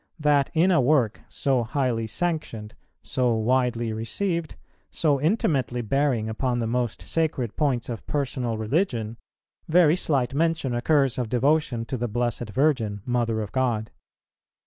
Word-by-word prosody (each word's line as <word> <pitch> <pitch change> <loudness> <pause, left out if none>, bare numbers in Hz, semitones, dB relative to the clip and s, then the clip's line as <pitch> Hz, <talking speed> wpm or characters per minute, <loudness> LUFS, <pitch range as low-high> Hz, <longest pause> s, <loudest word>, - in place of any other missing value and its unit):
that 145 -3 +2
in 175 +4 +4
a 170 - +4
work 125 -5 +2
so 135 -3 0
highly 120 -2 -1
sanctioned, 115 -6 -3 0.3
so 120 - +1
widely 120 0 +1
received, 165 - -3 0.3
so 145 -4 +1
intimately 145 - +1
bearing 120 -1 0
upon 120 +3 -1
the 120 - -1
most 120 0 -2
sacred 150 -9 -1
points 135 -6 0
of 115 -3 -5
personal 130 -5 -2
religion, 115 - -1 0.5
very 165 -1 +5
slight 135 -8 0
mention 160 -3 0
occurs 135 +1 +2
of 120 -3 -2
devotion 125 -1 +1
to 130 +3 -4
the 120 +1 -2
Blessed 120 0 -2
Virgin, 115 -6 0
Mother 120 -3 0
of 105 - -8
God. 120 -4 -1
125 Hz, 140 wpm, -25 LUFS, 115-150 Hz, 0.5 s, very